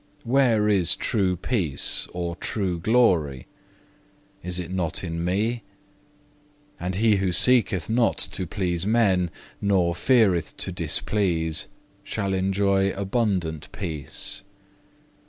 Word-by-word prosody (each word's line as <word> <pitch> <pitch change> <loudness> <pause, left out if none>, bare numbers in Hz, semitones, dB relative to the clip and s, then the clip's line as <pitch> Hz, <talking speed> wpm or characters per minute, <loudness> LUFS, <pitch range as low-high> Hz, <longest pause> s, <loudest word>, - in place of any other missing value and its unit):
Where 120 -4 +2
is 95 -6 +4
true 95 -4 0
peace 90 - 0
or 85 -1 -4
true 95 -5 -2
glory? 85 - +2 1.0
Is 90 0 -1
it 90 0 -6
not 90 -3 -2
in 85 -1 -4
Me? 110 +7 -1 1.2
And 90 +1 -3
he 105 0 +3
who 95 -1 0
seeketh 95 -3 +4
not 115 +1 +1
to 95 - -2
please 90 -1 -2
men, 100 -6 +2 0.3
nor 95 -4 +2
feareth 95 - +2
to - - -1
displease, 85 -6 -1 0.4
shall 100 -3 -3
enjoy 95 +1 +1
abundant 95 - -2
peace. 80 -8 -4
95 Hz, 110 wpm, -24 LUFS, 85-105 Hz, 1.2 s, is